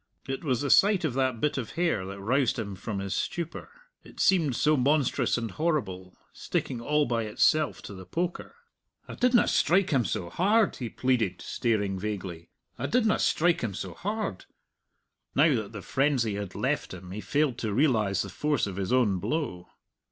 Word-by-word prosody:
It 135 +3 -4
was 130 -6 0
the 140 - 0
sight 200 -3 +5
of 145 - -1
that 130 -2 0
bit 150 0 0
of 120 - -6
hair 165 - 0
that 100 0 -7
roused 125 +5 +1
him 105 -4 -4
from 100 +2 -5
his 95 0 -3
stupor 170 - -4 0.3
it - - -15
seemed 165 -9 +3
so 150 +4 +3
monstrous 140 0 +2
and 115 -2 -3
horrible, 105 - -2 0.2
sticking 125 -3 -3
all 150 +4 +2
by 115 -2 -1
itself 150 +8 +1
to - - -8
the 95 -1 -10
poker. 175 - -3 0.5
"I - - -7
didna 245 -1 +3
strike 180 +4 +3
him 135 -4 +3
so 90 -6 -3
hard," 210 +4 +2
he 120 -3 -4
pleaded, 115 -7 0
staring 105 -5 -1
vaguely, 95 -5 -5 0.3
"I - - -1
didna 225 -3 +2
strike 170 +1 +2
him 105 -5 -3
so 95 -2 -5
hard." 205 - -4 0.9
Now 150 +2 +5
that 110 -4 -2
the 105 -4 -8
frenzy 130 -6 +1
had 100 -2 -5
left - - -1
him, 90 0 -11
he 105 +3 -5
failed 130 +4 0
to 110 - -2
realize 105 - +2
the 100 - -7
force 145 +7 0
of 100 -2 -6
his 95 +1 -2
own 115 -7 +3
blow. 90 - -3
125 Hz, 180 wpm, -28 LUFS, 100-155 Hz, 0.9 s, sight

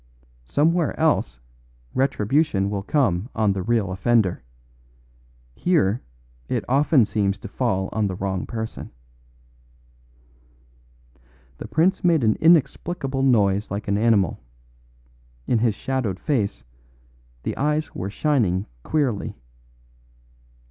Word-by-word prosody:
Somewhere 160 - +1
else 105 - +1 0.5
retribution 130 -4 +1
will 100 -1 -2
come 110 - 0
on 110 -3 +2
the 95 - -3
real 110 -2 0
offender. 95 - +1 1.1
Here 125 - +1 0.5
it - - -1
often 140 -1 +4
seems 100 -2 0
to - - -9
fall 95 -7 -1
on 110 -2 0
the 95 - -4
wrong 95 0 -3
person." 110 -1 -5 2.7
The - - -6
prince 185 +5 +1
made 165 -6 +3
an 110 -1 +3
inexplicable 160 -3 +2
noise 105 -6 +2
like 100 +3 -5
an 100 +1 +1
animal; 105 -6 +2 1.1
in 120 - +1
his 115 -2 +1
shadowed 120 -9 -2
face 100 - -1 0.8
the - - -3
eyes 150 +2 -1
were 95 +2 -4
shining 105 - +1 0.2
queerly. 135 - -1
110 Hz, 105 wpm, -23 LUFS, 100-145 Hz, 2.7 s, often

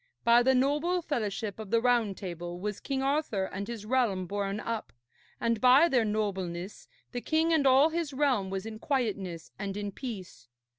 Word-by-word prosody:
By 235 0 +6
the 265 +2 +3
noble 300 +7 +1
fellowship 215 - -3
of 215 -3 -7
the 230 +2 +3
Round 235 -5 +2
Table 175 -2 -6
was 210 +1 -3
King 270 -1 -2
Arthur 275 -8 0
and 195 +1 -5
his 230 -3 -6
realm 220 -6 +1
borne 200 +2 -2
up, 230 0 -4 0.5
and 230 -2 0
by 260 +6 +7
their 250 -8 +2
nobleness 195 -3 -3 0.2
the 245 - -4
king 320 +4 +2
and 290 -4 +3
all 270 +4 +6
his 325 -2 -2
realm 260 -8 +1
was 190 +1 -4
in 220 -1 -7
quietness 200 - -2
and 200 0 -4
in 205 -1 -3
peace. 190 - -8
225 Hz, 180 wpm, -29 LUFS, 195-265 Hz, 0.5 s, by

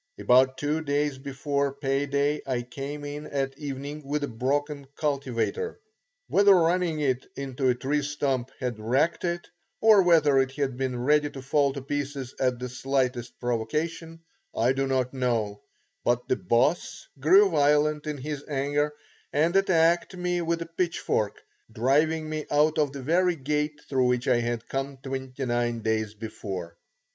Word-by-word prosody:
About 130 +1 +4
two 150 +3 -1
days 145 -2 -1
before 140 +1 -1
pay 140 0 -1
day 140 +2 +1
I 125 -2 -1
came 140 +4 -6
in 145 +1 -6
at 135 -1 -2
evening 145 +1 -5
with 145 +1 -2
a - - 0
broken 140 +4 -2
cultivator. 140 - -2 0.5
Whether 200 -1 +6
running 170 -2 +2
it 130 -3 0
into 135 -1 -1
a 125 - +3
tree 140 +4 0
stump 140 -3 -1
had 125 -4 -3
wrecked 135 +12 +1
it, 175 0 -2 0.3
or 220 -2 +7
whether 155 -6 +5
it 135 0 +1
had 135 -3 -1
been 130 -1 -2
ready 150 +2 +3
to 135 -2 -9
fall 140 +1 +2
to 140 -1 -6
pieces 140 -2 -4
at 125 -1 +1
the 125 +1 -5
slightest 125 -1 -2
provocation 155 +8 -2 0.3
I 120 +3 +3
do 135 0 -1
not 130 -1 0
know; 115 -6 -1 0.4
but 120 0 +1
the - - +2
"Boss" 120 - 0
grew 190 +8 +6
violent 150 0 +2
in 150 -1 -3
his 145 +1 -5
anger 145 +1 0 0.4
and 160 +5 +2
attacked 175 -1 +3
me 180 0 -1
with 170 0 -1
a 165 0 -17
pitchfork, 165 - 0 0.3
driving 150 +7 +2
me 155 -1 -4
out 150 +2 +3
of 145 -2 +2
the 140 -1 -7
very 175 +5 +2
gate 150 +1 -2
through 130 -2 +2
which 125 0 0
I 125 - +4
had 120 -1 -3
come 135 0 -3
twenty 130 0 -5
nine 120 -1 0
days 110 -1 -1
before. 95 -5 -6
140 Hz, 160 wpm, -27 LUFS, 130-150 Hz, 0.5 s, or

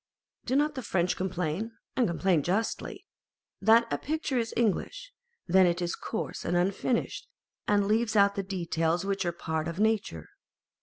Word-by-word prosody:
Do 255 - 0
not 295 +2 +2
the 260 - -5
French 180 -5 0
complain 185 +3 -2 0.2
(and 250 - +3
complain 175 -1 +2
justly) 195 +9 -2 0.6
that 225 +3 +6
a - - -1
picture 300 -4 -1
is 225 -1 -2
English, - - -1 0.3
when 185 +1 +5
it 170 0 0
is 175 -1 -2
coarse 220 - -5
and 175 +1 0
unfinished, 195 - -1 0.4
and 205 -1 +3
leaves 220 +1 +1
out 200 -1 +5
the 200 - -2
details 175 -2 -1
which 195 -1 -1
are 175 - +1
one 170 - -21
part 160 -1 -2
of 170 +2 -5
nature? 210 - 0
195 Hz, 165 wpm, -28 LUFS, 175-225 Hz, 0.6 s, that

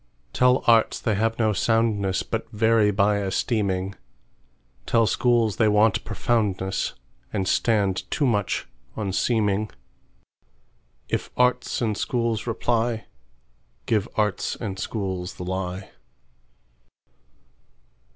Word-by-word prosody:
Tell 125 0 +3
arts 115 -1 +4
they 110 - 0
have 110 +2 0
no 110 -2 +2
soundness, 105 -2 +1
But - - -4
vary 110 0 +3
by 100 0 +2
esteeming; 95 -1 -1 0.9
Tell 115 -1 +3
schools 115 -3 +2
they 110 - +4
want 105 0 +3
profoundness, 105 -4 -1 0.4
And 95 -3 -1
stand 100 -5 +1
too 145 - 0
much 105 -6 0 0.3
on 100 -3 -2
seeming:If 100 - -4
arts 125 0 +1
and 110 -2 0
schools 115 -1 -1
reply, 115 0 0 0.8
Give 105 -4 0
arts 105 -3 0
and 100 -5 -5
schools 95 -4 -4
the - - -7
lie. 95 +1 -4
105 Hz, 100 wpm, -24 LUFS, 95-115 Hz, 0.9 s, arts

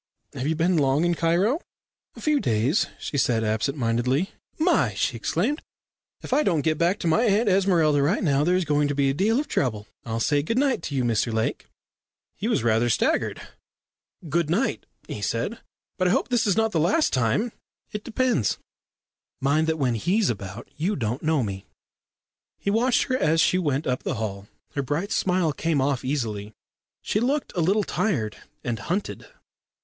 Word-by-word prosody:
Have 130 - -3
you 160 - +1
been 170 +2 +2
long 140 +2 +2
in 175 - +2
Cairo?" 175 - +1 0.5
"A - - -11
few 300 -2 +2
days," 120 - +1
she 145 - -2
said 115 -3 +2
absent 110 +7 -1
mindedly. 125 +7 0 0.3
"My!" 330 +3 +2
she - - 0
exclaimed. 295 +2 -1 0.6
"If - - -3
I - - +4
don't 170 - +1
go 160 - +2
back 170 +5 +1
to - - -1
my 165 +7 +3
Aunt 215 +1 +2
Esmeralda 175 -7 +3
right 165 +10 +1
now, 145 -4 +2
there's 180 +2 +2
going 145 -1 +2
to 145 - -2
be 140 -1 +2
a - - -2
deal 215 - +2
of 295 - -3
trouble. 110 - -1 0.2
I'll 115 -1 -3
say 145 +5 +2
good 225 +11 -2
night 270 -7 +2
to 145 - -5
you, 130 - +1
Mr 115 0 +1
Lake." 110 0 -2 0.7
He 205 - -3
was 230 - +1
rather 115 +1 +2
staggered. - - 0 0.8
"Good 155 +1 0
night," 210 +11 0 0.2
he - - -6
said. - - -2 0.4
"But 185 - +3
I - - +3
hope - - +1
this 245 -4 +2
is 200 - +2
not 225 0 +2
the 165 - +1
last 195 - +2
time 130 - +1 0.2
" - - -47
"It 210 0 -4
depends. 235 - 0 0.8
Mind 145 +4 +2
that 160 0 0
when 130 -5 +1
he's 180 - +1
about 100 +1 -7
you 180 +8 -1
don't 120 0 -2
know 155 -4 +1
me." 95 -2 -5 0.9
He 200 - -1
watched 240 +4 +3
her 255 - 0
as 160 +2 +2
she 180 - +3
went 145 -4 0
up 125 0 -1
the - - -2
hall. 100 -3 -4 0.3
Her 140 - -1
bright 145 +9 -2
smile 180 -4 +1
came 160 -1 0
off 135 -1 +1
very 130 - -3
easily. 110 -6 -3 0.5
She 210 - 0
looked 270 +5 -1
a 175 - +1
little 200 +6 +2
tired 125 - -1 0.3
and 120 -3 -2
hunted. 180 - -3
155 Hz, 190 wpm, -25 LUFS, 125-200 Hz, 0.9 s, I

